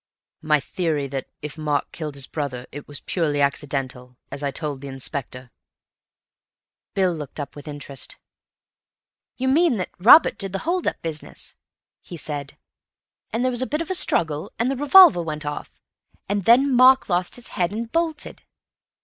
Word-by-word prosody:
"My 150 Hz, -1 st, +3 dB
theory 155 Hz, 0 st, -2 dB
that, 135 Hz, -1 st, -4 dB, 0.2 s
if 150 Hz, +1 st, -7 dB
Mark 150 Hz, -2 st, -1 dB
killed 150 Hz, -3 st, -6 dB
his 140 Hz, -2 st, -3 dB
brother, 130 Hz, -5 st, -4 dB
it 145 Hz, -, -9 dB
was 145 Hz, -1 st, -5 dB
purely 155 Hz, -5 st, -1 dB
accidental—as 135 Hz, -2 st, -3 dB
I 140 Hz, -, -1 dB
told 145 Hz, -1 st, -4 dB
the 140 Hz, -, -7 dB
Inspector." 130 Hz, -2 st, -5 dB, 1.4 s
Bill 190 Hz, -3 st, +2 dB
looked 150 Hz, -2 st, -8 dB
up 145 Hz, -, -6 dB
with 145 Hz, +1 st, -11 dB
interest. 145 Hz, -2 st, -8 dB, 1.2 s
"You 260 Hz, -, -1 dB
mean 295 Hz, -1 st, +3 dB
that 185 Hz, -, -3 dB
Robert 235 Hz, -, +7 dB
did 195 Hz, -2 st, -2 dB
the -, -, 0 dB
hold 355 Hz, +1 st, 0 dB
up -, -, -1 dB
business," 160 Hz, -2 st, -6 dB, 0.5 s
he 175 Hz, -, -9 dB
said, 145 Hz, -2 st, -4 dB, 0.7 s
"and 230 Hz, -, -1 dB
there 255 Hz, -, +2 dB
was 245 Hz, 0 st, 0 dB
a 260 Hz, -, -1 dB
bit 300 Hz, +3 st, -1 dB
of 335 Hz, -, -7 dB
a -, -, +2 dB
struggle, 160 Hz, -, +1 dB
and 240 Hz, +3 st, +1 dB
the -, -, -1 dB
revolver 290 Hz, -, +7 dB
went 155 Hz, -2 st, -5 dB
off, 145 Hz, 0 st, -5 dB, 0.6 s
and 200 Hz, -2 st, -1 dB
then 260 Hz, +4 st, +5 dB
Mark 260 Hz, +2 st, +6 dB
lost 180 Hz, -1 st, 0 dB
his 245 Hz, -, -8 dB
head 180 Hz, -2 st, -1 dB
and 225 Hz, +2 st, -5 dB
bolted? 330 Hz, -2 st, -2 dB
160 Hz, 165 wpm, -23 LUFS, 145-240 Hz, 1.4 s, Robert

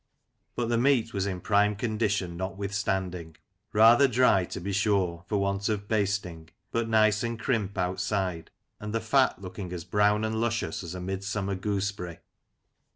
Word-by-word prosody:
But 120 Hz, -1 st, -1 dB
the 120 Hz, -1 st, +2 dB
meat 120 Hz, -3 st, +2 dB
was 100 Hz, -1 st, -1 dB
in 90 Hz, -2 st, -4 dB
prime 105 Hz, +1 st, +2 dB
condition 105 Hz, -5 st, -1 dB
notwithstanding; 95 Hz, -3 st, -3 dB, 0.4 s
rather 115 Hz, +5 st, +6 dB
dry, 125 Hz, -7 st, +3 dB
to -, -, -6 dB
be 100 Hz, +3 st, -4 dB
sure, 95 Hz, -4 st, +1 dB
for 105 Hz, -, 0 dB
want 100 Hz, +1 st, 0 dB
of 100 Hz, -1 st, -2 dB
basting, 100 Hz, -6 st, -1 dB, 0.2 s
but 115 Hz, -1 st, -1 dB
nice 110 Hz, -1 st, +4 dB
and 115 Hz, -1 st, -3 dB
crimp 110 Hz, -6 st, -1 dB
outside, 90 Hz, -1 st, -1 dB, 0.3 s
and 105 Hz, +1 st, -5 dB
the -, -, +2 dB
fat 130 Hz, +3 st, +2 dB
looking 90 Hz, 0 st, -7 dB
as 90 Hz, -2 st, -5 dB
brown 105 Hz, +3 st, +2 dB
and 110 Hz, 0 st, -1 dB
luscious 115 Hz, -8 st, -1 dB
as 85 Hz, +1 st, -6 dB
a -, -, -5 dB
midsummer 95 Hz, +2 st, -3 dB
gooseberry. 95 Hz, -3 st, -3 dB
100 Hz, 155 wpm, -28 LUFS, 95-110 Hz, 0.4 s, rather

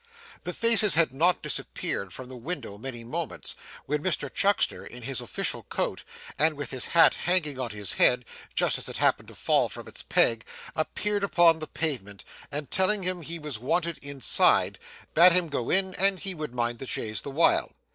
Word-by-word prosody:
The 180 Hz, -, -3 dB
faces 225 Hz, -5 st, +5 dB
had 160 Hz, -5 st, +3 dB
not 170 Hz, +6 st, +2 dB
disappeared 95 Hz, -2 st, -3 dB
from 130 Hz, +7 st, -8 dB
the 130 Hz, -, -10 dB
window 125 Hz, -, -6 dB
many 120 Hz, -1 st, -7 dB
moments, 155 Hz, +6 st, -5 dB, 0.3 s
when 150 Hz, +1 st, -2 dB
Mr 185 Hz, -, -2 dB
Chuckster 200 Hz, +1 st, +1 dB
in 125 Hz, 0 st, -11 dB
his 135 Hz, 0 st, -4 dB
official -, -, -4 dB
coat, -, -, -4 dB, 0.4 s
and 155 Hz, 0 st, +3 dB
with 145 Hz, -3 st, -6 dB
his 130 Hz, -2 st, 0 dB
hat 165 Hz, -, +8 dB
hanging 160 Hz, -6 st, 0 dB
on 125 Hz, -2 st, -3 dB
his 105 Hz, -3 st, -2 dB
head 125 Hz, -1 st, +3 dB, 0.3 s
just -, -, +1 dB
as -, -, -4 dB
it -, -, -6 dB
happened -, -, +1 dB
to -, -, -13 dB
fall -, -, +1 dB
from -, -, -9 dB
its -, -, -7 dB
peg, 115 Hz, -1 st, +2 dB, 0.3 s
appeared 205 Hz, +6 st, -2 dB
upon 170 Hz, -4 st, +4 dB
the 155 Hz, -, -6 dB
pavement, 120 Hz, -14 st, -3 dB, 0.3 s
and 145 Hz, -1 st, -5 dB
telling 190 Hz, +1 st, +4 dB
him 180 Hz, -1 st, -2 dB
he 165 Hz, +1 st, -4 dB
was 150 Hz, -8 st, -5 dB
wanted 165 Hz, +6 st, -1 dB
inside, 140 Hz, -2 st, +2 dB, 0.3 s
bade 175 Hz, +2 st, +7 dB
him 180 Hz, -2 st, +3 dB
go 130 Hz, -5 st, -3 dB
in 190 Hz, 0 st, +2 dB
and 195 Hz, 0 st, +2 dB
he 195 Hz, -1 st, 0 dB
would 150 Hz, -7 st, -7 dB
mind 120 Hz, -1 st, -2 dB
the 135 Hz, -, -7 dB
chaise 110 Hz, -3 st, -3 dB
the -, -, -7 dB
while. 155 Hz, +5 st, +2 dB
150 Hz, 190 wpm, -26 LUFS, 125-180 Hz, 0.4 s, hat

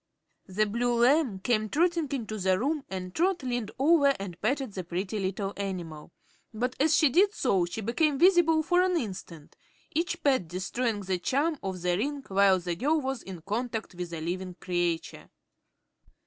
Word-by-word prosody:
The 200 Hz, +3 st, +1 dB
blue 240 Hz, +3 st, 0 dB
lamb 265 Hz, -5 st, +3 dB
came 215 Hz, -1 st, 0 dB
trotting 335 Hz, -, +1 dB
into 220 Hz, -6 st, -3 dB
the 185 Hz, -1 st, +2 dB
room 285 Hz, +6 st, -1 dB
and 185 Hz, -1 st, -5 dB
Trot 355 Hz, -2 st, +1 dB
leaned 245 Hz, -4 st, -2 dB
over 280 Hz, -1 st, +4 dB
and 180 Hz, -3 st, -7 dB
patted 260 Hz, 0 st, -1 dB
the 185 Hz, -, -4 dB
pretty 185 Hz, +5 st, -3 dB
little 195 Hz, +1 st, -2 dB
animal; 175 Hz, -6 st, -5 dB, 0.4 s
but 245 Hz, +3 st, -2 dB
as 300 Hz, +2 st, +4 dB
she 310 Hz, -, +5 dB
did 390 Hz, -, +3 dB
so 195 Hz, -9 st, +2 dB
she 175 Hz, +6 st, -5 dB
became 275 Hz, +7 st, +1 dB
visible 335 Hz, -2 st, +5 dB
for 355 Hz, +2 st, +3 dB
an 365 Hz, -1 st, +2 dB
instant, 185 Hz, -, -6 dB, 0.4 s
each 335 Hz, +1 st, -2 dB
pat 260 Hz, -, +2 dB
destroying 205 Hz, +5 st, -2 dB
the 185 Hz, -2 st, -2 dB
charm 290 Hz, -, 0 dB
of 190 Hz, -2 st, -5 dB
the 180 Hz, -1 st, +2 dB
ring 280 Hz, +4 st, -2 dB
while 195 Hz, -1 st, +4 dB
the 175 Hz, -1 st, -3 dB
girl 295 Hz, -, +1 dB
was 265 Hz, -3 st, -3 dB
in 180 Hz, -4 st, -9 dB
contact 225 Hz, +1 st, -3 dB
with 175 Hz, -1 st, -6 dB
a 165 Hz, -2 st, -5 dB
living 180 Hz, +2 st, -4 dB
creature. 175 Hz, -2 st, -2 dB
220 Hz, 175 wpm, -28 LUFS, 185-285 Hz, 0.4 s, she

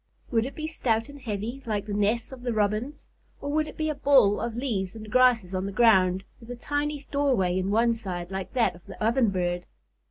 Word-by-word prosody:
Would 230 Hz, 0 st, +2 dB
it 275 Hz, -, -9 dB
be 310 Hz, -, -4 dB
stout 230 Hz, -7 st, -1 dB
and 285 Hz, -1 st, -11 dB
heavy 225 Hz, +3 st, -4 dB
like 205 Hz, -2 st, -1 dB
the 210 Hz, -, -4 dB
nests 210 Hz, +4 st, 0 dB
of 260 Hz, -2 st, -9 dB
the 245 Hz, -1 st, -2 dB
Robins? 215 Hz, +6 st, -1 dB, 0.3 s
Or 285 Hz, -, -4 dB
would 310 Hz, +1 st, +1 dB
it -, -, -10 dB
be 315 Hz, -, -1 dB
a 305 Hz, -, 0 dB
ball 270 Hz, -8 st, +4 dB
of 235 Hz, -1 st, -3 dB
leaves 220 Hz, -7 st, -2 dB
and 215 Hz, -1 st, -9 dB
grasses 240 Hz, -7 st, +4 dB
on 185 Hz, +1 st, -1 dB
the -, -, -4 dB
ground, 190 Hz, -4 st, +4 dB, 0.2 s
with 230 Hz, -, -14 dB
a 245 Hz, -, -4 dB
tiny 290 Hz, +3 st, -3 dB
doorway 255 Hz, -11 st, +2 dB
in 185 Hz, +1 st, 0 dB
one 230 Hz, +3 st, +3 dB
side, 185 Hz, -5 st, -5 dB
like 190 Hz, -1 st, -5 dB
that 245 Hz, -3 st, +2 dB
of 175 Hz, 0 st, -16 dB
the -, -, -9 dB
Ovenbird? 195 Hz, -7 st, +1 dB
225 Hz, 220 wpm, -26 LUFS, 195-260 Hz, 0.3 s, ball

